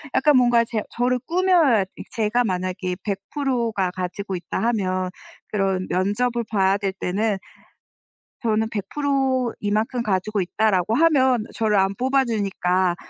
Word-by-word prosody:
약간 290 -1 +5
뭔가 240 -2 +4
제 225 -2 -2
저를 250 +1 0
꾸며야 340 - +4 0.2
이 - - -7
제가 230 +2 +1
만약에 185 -1 -2
100%가 220 -1 -1
가지고 185 +1 -4
있다 175 - -4
하면 185 -4 -1 0.4
그런 195 -2 -1
면접을 230 +5 0
봐야 195 -2 +2
될 195 -2 -2
때는 200 +2 -1 1.1
'저는 220 -1 +1
100% 260 +2 0
이만큼 215 +4 0
가지고 205 0 -1
있다.'라고 195 +2 +1
하면 260 -6 +3
저를 215 -2 +1
안 195 +1 +2
뽑아주니까 200 -9 +1
215 Hz, 255 characters per minute, -23 LUFS, 190-245 Hz, 1.1 s, 약간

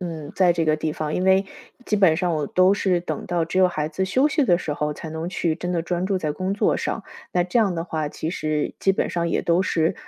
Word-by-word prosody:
嗯， 160 -5 -6
在 180 -2 +4
这 170 -1 0
个 155 - +3
地 155 0 -2
方。 155 -1 -3
因 180 - -1
为 190 +1 +4 0.4
基 - - +1
本 190 -6 +4
上 175 0 0
我 155 -2 -1
都 185 +2 +4
是 185 -3 +1
等 - - -4
到 175 -1 0
只 165 - -6
有 185 -1 +6
孩 155 -3 -2
子 190 +5 -2
休 260 +9 +2
息 300 -1 +2
的 175 -8 +3
时 160 - -3
候， 150 0 -2
才 160 - -8
能 160 +2 -4
去 170 -3 -1
真 180 +1 -4
的 175 - 0
专 175 +2 -2
注 190 -1 0
在 155 -4 -2
工 185 +4 -2
作 200 - +1
上。 - - -3 0.3
那 180 -1 +2
这 180 - -2
样 210 -5 +3
的 165 -1 -3
话， 155 -3 -3
其 155 - -5
实 155 -3 -2
基 195 - +3
本 190 - 0
上 170 -1 -1
也 - - 0
都 170 +2 +2
是， 165 -3 +1
175 Hz, 290 characters per minute, -23 LUFS, 160-185 Hz, 0.4 s, 有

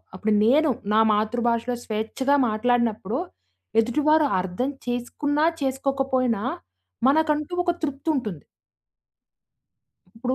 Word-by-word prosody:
అప్పుడు 210 +3 0
నేను, 295 +7 +4 0.2
నా 220 - +5
మాతృభాషలో 235 +3 0
స్వేచ్ఛగా 225 +6 0
మాట్లాడినప్పుడు, 225 -1 0 0.6
ఎదుటివారు 300 +7 +3 0.2
అర్థం 190 +9 -2 0.2
చేసుకున్నా, 285 +5 -1 0.2
చేసుకోకపోయినా 265 -4 0 0.6
మనకంటూ 300 +2 +1
ఒక 350 - +2
తృప్తుంటుంది. 275 - -2 1.7
ఇప్పుడు 250 +3 -2
250 Hz, 80 wpm, -24 LUFS, 225-285 Hz, 1.7 s, నా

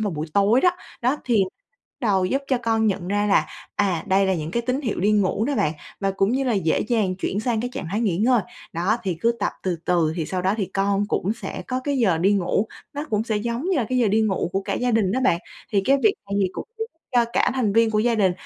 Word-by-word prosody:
vào 210 -2 0
buổi 155 +1 -4
tối 205 +6 +4
đó. 360 - +5 0.3
Đó, 255 +5 +2
thì 225 -5 +3 0.4
bắt 265 - -8
đầu 190 -2 +3
giúp 270 +9 0
cho 260 -2 +2
con 225 -1 +2
nhận 190 -3 -1
ra 205 +1 +1
là, 200 - +3 0.3
à, 190 -5 +1
đây 195 0 +3
là 190 - +2
những 155 -2 -4
cái 235 +6 -1
tín 255 +3 -1
hiệu 230 -9 -2
đi 205 +3 +3
ngủ 205 +1 +2
đó 285 - 0
bạn, 155 - +1 0.3
và 195 -1 +1
cũng 195 +2 +1
như 270 +1 +1
là 250 - +1
dễ 185 -7 +1
dàng 215 -5 0
chuyển 195 +2 -2
sang 230 -2 0
cái 245 - -3
trạng - - -5
thái 210 - -1
nghỉ 195 -7 0
ngơi. 235 +2 +4 0.3
Đó, 180 +6 +1
thì 190 -5 -1
cứ 235 +4 +3
tập - - 0
từ 180 -3 -1
từ 170 -3 +2
thì 160 -3 -2
sau 185 -1 -2
đó 190 +3 +2
thì 200 -4 -1
con 195 +1 0
cũng 200 0 0
sẽ 230 - -6
có 255 0 -2
cái 285 -2 0
giờ 190 -9 +3
đi 195 +4 +3
ngủ, 195 +2 +1 0.3
nó 290 +1 -3
cũng 215 0 +1
sẽ 220 -2 -1
giống 235 +5 -2
như 370 - +2
là 235 -5 0
cái 255 0 +1
giờ 230 -4 +3
đi 215 +3 +3
ngủ 195 -4 0
của 195 - 0
cả - - -2
gia 245 0 0
đình 215 -4 +2
đó 260 - 0
bạn. 170 -10 +3 0.3
Thì 200 -1 +3
cái 275 +5 +4
việc 420 - +4 0.2
này - - -1
thì 190 - +2
cũng - - -7
giúp 445 - -1 0.3
cho 240 -1 +4
cả - - +2
thành 225 -6 +1
viên 230 0 +4
của 215 - +1
gia 235 +2 +2
đình, 195 -5 +3
210 Hz, 280 wpm, -23 LUFS, 190-235 Hz, 0.4 s, đó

